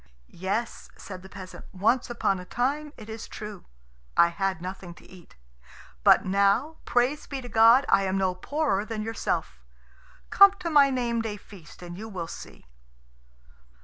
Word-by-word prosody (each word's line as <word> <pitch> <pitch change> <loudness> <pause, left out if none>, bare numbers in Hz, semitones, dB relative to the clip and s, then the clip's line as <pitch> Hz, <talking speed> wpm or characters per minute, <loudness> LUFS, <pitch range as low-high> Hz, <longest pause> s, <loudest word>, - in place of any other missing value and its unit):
"Yes," 200 +6 -4
said 185 -2 -9
the 190 - -13
peasant, 185 -2 -10
"once 225 +7 +1
upon 200 -5 0
a - - -8
time, 285 +8 -2
it 215 - -11
is 220 0 -7
true, 210 -3 -9 0.5
I 170 - +6
had 190 0 -2
nothing 180 0 -8
to - - -17
eat; 180 -3 -16 0.7
but - - +6
now, 200 +11 +2
praise 255 +5 0
be 275 - -5
to 250 - -8
God, 230 +4 +6
I 195 - +3
am 190 0 -1
no 190 -1 +1
poorer 240 +1 -1
than 215 -1 -5
yourself. 225 +1 -3 0.7
Come 395 0 +8
to 365 -4 -5
my 285 -2 +6
name 240 -3 -1
day 215 -2 -4
feast 185 -3 -15
and 175 +1 -8
you 220 +1 -7
will 180 -5 -5
see." - - -11
215 Hz, 165 wpm, -26 LUFS, 190-245 Hz, 0.7 s, Come